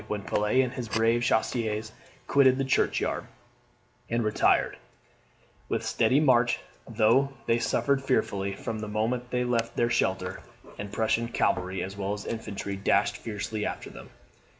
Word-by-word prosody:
When 105 Hz, -1 st, -3 dB
Pelet 105 Hz, +7 st, +2 dB
and 125 Hz, -, -3 dB
his 120 Hz, -3 st, -5 dB
brave 115 Hz, +2 st, +2 dB
chasseurs 110 Hz, -2 st, 0 dB, 0.3 s
quitted 130 Hz, -1 st, +4 dB
the 135 Hz, -, 0 dB
churchyard, 135 Hz, -, 0 dB, 0.8 s
and 115 Hz, 0 st, 0 dB
retired 110 Hz, 0 st, +2 dB, 0.9 s
with -, -, -1 dB
steady 135 Hz, -, +3 dB
march, 125 Hz, -5 st, +4 dB, 0.3 s
though 120 Hz, +5 st, +3 dB
they 115 Hz, -, +2 dB
suffered 140 Hz, +3 st, +1 dB
fearfully 100 Hz, -7 st, 0 dB
from 110 Hz, -2 st, -5 dB
the 105 Hz, -, -5 dB
moment 115 Hz, +4 st, -1 dB
they 125 Hz, 0 st, 0 dB
left 115 Hz, -2 st, -1 dB
their 120 Hz, 0 st, +2 dB
shelter, -, -, 0 dB, 0.4 s
and 100 Hz, 0 st, -5 dB
Prussian 115 Hz, +2 st, +1 dB
cavalry 95 Hz, -4 st, 0 dB
as 95 Hz, +1 st, -6 dB
well 100 Hz, 0 st, -2 dB
as 105 Hz, -1 st, -6 dB
infantry 100 Hz, -3 st, -4 dB
dashed 100 Hz, +4 st, +2 dB
fiercely 105 Hz, -1 st, -4 dB
after -, -, -4 dB
them. -, -, -11 dB
115 Hz, 150 wpm, -27 LUFS, 105-125 Hz, 0.9 s, quitted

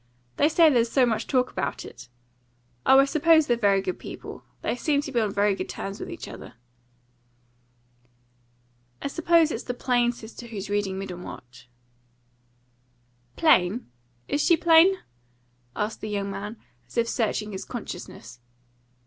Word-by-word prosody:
They 295 Hz, -, +4 dB
say 325 Hz, +1 st, +5 dB
there's 240 Hz, -6 st, +3 dB
so 260 Hz, +1 st, +4 dB
much 225 Hz, -3 st, -1 dB
talk 255 Hz, -2 st, +1 dB
about -, -, -3 dB
it. -, -, -12 dB, 0.8 s
Oh, 265 Hz, -, +8 dB
I 275 Hz, -, +7 dB
suppose 315 Hz, +2 st, +4 dB
they're 240 Hz, -, +2 dB
very 200 Hz, -4 st, +2 dB
good 185 Hz, -, -3 dB
people. -, -, -9 dB, 0.2 s
They -, -, 0 dB
seemed 285 Hz, +2 st, 0 dB
to 285 Hz, -, -6 dB
be 240 Hz, -3 st, +1 dB
on 210 Hz, -2 st, 0 dB
very 200 Hz, +1 st, +2 dB
good -, -, -5 dB
terms 195 Hz, +1 st, -6 dB
with -, -, -6 dB
each -, -, -7 dB
other." -, -, -10 dB, 2.4 s
"I -, -, -3 dB
suppose 330 Hz, +1 st, +3 dB
it's 230 Hz, -, -3 dB
the 245 Hz, -, -3 dB
plain 245 Hz, -1 st, +2 dB
sister 235 Hz, 0 st, -11 dB
who's 205 Hz, -3 st, -6 dB
reading 205 Hz, -2 st, -1 dB
Middlemarch." 130 Hz, -10 st, -9 dB, 1.7 s
"Plain? 220 Hz, -, +3 dB, 0.4 s
Is 290 Hz, -, 0 dB
she 340 Hz, -, +4 dB
plain?" 340 Hz, +3 st, +6 dB, 0.8 s
asked 210 Hz, +1 st, -3 dB
the 215 Hz, -, -5 dB
young 200 Hz, -1 st, -2 dB
man, 205 Hz, +3 st, -6 dB, 0.3 s
as -, -, -13 dB
if 235 Hz, 0 st, +2 dB
searching 215 Hz, -2 st, -1 dB
his 190 Hz, -, -5 dB
consciousness. 125 Hz, -, -8 dB
235 Hz, 150 wpm, -25 LUFS, 200-285 Hz, 2.4 s, Oh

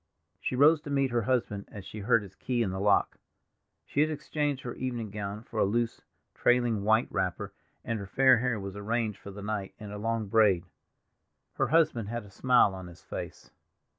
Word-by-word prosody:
She -, -, -2 dB
rose 150 Hz, +4 st, +5 dB
to 145 Hz, -, -9 dB
meet 140 Hz, -2 st, +1 dB
her 120 Hz, 0 st, +1 dB
husband 110 Hz, -4 st, -1 dB
as 100 Hz, -2 st, -10 dB
she 110 Hz, -, -8 dB
heard 115 Hz, +1 st, +3 dB
his 95 Hz, -2 st, -12 dB
key 120 Hz, +4 st, -1 dB
in 95 Hz, -, -2 dB
the 95 Hz, -, -4 dB
lock. 100 Hz, +1 st, +2 dB, 0.7 s
She 145 Hz, -, 0 dB
had 155 Hz, -, +3 dB
exchanged 145 Hz, -2 st, -2 dB
her 120 Hz, -, -4 dB
evening 120 Hz, -5 st, -4 dB
gown 105 Hz, +1 st, -5 dB
for 115 Hz, -2 st, -5 dB
a -, -, +5 dB
loose, 115 Hz, +4 st, 0 dB, 0.3 s
trailing 120 Hz, -4 st, +2 dB
white 110 Hz, +3 st, +3 dB
wrapper, 95 Hz, -2 st, -2 dB, 0.3 s
and 115 Hz, -1 st, -2 dB
her 100 Hz, -, -6 dB
fair 130 Hz, +3 st, +5 dB
hair 125 Hz, -2 st, 0 dB
was 100 Hz, 0 st, -6 dB
arranged 110 Hz, 0 st, -2 dB
for -, -, -10 dB
the 100 Hz, 0 st, -8 dB
night 105 Hz, -2 st, -4 dB
in 105 Hz, -1 st, -9 dB
a 105 Hz, -, -6 dB
long 115 Hz, 0 st, -1 dB
braid. 100 Hz, -4 st, +3 dB, 0.9 s
Her -, -, 0 dB
husband 150 Hz, -10 st, +2 dB
had 120 Hz, 0 st, -3 dB
a 100 Hz, -, -15 dB
smile 125 Hz, -3 st, +4 dB
on 95 Hz, -1 st, -8 dB
his 85 Hz, 0 st, -14 dB
face. -, -, -7 dB
110 Hz, 200 wpm, -29 LUFS, 100-125 Hz, 0.9 s, rose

